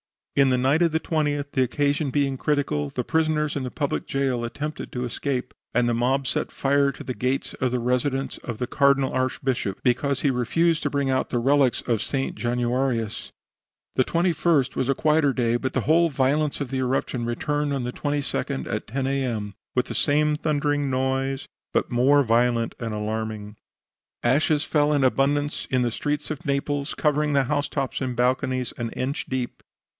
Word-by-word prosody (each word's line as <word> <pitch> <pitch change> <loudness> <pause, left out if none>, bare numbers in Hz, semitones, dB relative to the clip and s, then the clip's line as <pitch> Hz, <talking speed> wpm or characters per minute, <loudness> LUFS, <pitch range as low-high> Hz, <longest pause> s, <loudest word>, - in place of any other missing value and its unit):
"In 140 -1 +5
the 130 - +3
night 135 +6 +2
of 170 -2 +3
the 160 - +2
20th, 145 -3 -1
the 130 - +1
occasion 145 +3 +1
being 135 -1 0
critical, 130 - 0
the 125 - -3
prisoners 155 0 +1
in 140 - -1
the 130 - -3
public 145 +2 -2
jail 135 -3 0
attempted 150 +6 -5
to 125 - -2
escape, 125 +1 -3 0.2
and 120 0 +3
the 120 - +2
mob 130 +4 +1
set - - -1
fire 140 0 +2
to - - -9
the 130 - -4
gates 130 +2 -1
of 130 - 0
the 125 0 -1
residence 125 +3 -1
of 120 -3 -6
the 125 - -1
Cardinal 140 +1 +3
Archbishop 130 -5 -1
because 135 +2 +1
he 140 - +3
refused 160 +6 +1
to 145 - +1
bring 140 -1 0
out 130 - 0
the 125 - -1
relics 135 +1 +3
of 115 -3 0
St. 135 +1 -2
Januarius. 120 0 -1 0.6
The 130 - +3
21st 170 -5 +2
was 130 0 -1
a 135 - +3
quieter 150 -2 +3
day, 120 -2 +1
but 130 +1 -3
the 130 - +1
whole 165 +6 +4
violence 145 +2 +1
of 135 -3 -4
the 135 - -1
eruption 130 -1 -1
returned 145 +5 -1
on 135 -2 -1
the 125 0 -3
22d, 145 - -2
at - - -3
10 130 +4 -2
A. 135 0 0
M., 105 -5 -3 0.2
with 125 - +2
the - - -4
same 150 +1 +2
thundering 145 -2 0
noise, 135 +1 -1 0.3
but - - 0
more 135 +4 +4
violent 115 0 +2
and 115 -2 -3
alarming. 105 0 -4 0.7
Ashes 145 +4 +3
fell 150 -1 +2
in 145 -2 +2
abundance 145 +3 +1
in 130 -1 +2
the 120 - 0
streets 150 +5 -2
of 150 - -6
Naples, 140 0 -1
covering 150 0 +1
the 140 -1 +4
housetops 145 -1 -1
and 130 -2 -2
balconies 130 0 0
an 115 -1 -3
inch 135 +3 -3
deep. 130 -2 -3
135 Hz, 185 wpm, -24 LUFS, 125-145 Hz, 0.7 s, In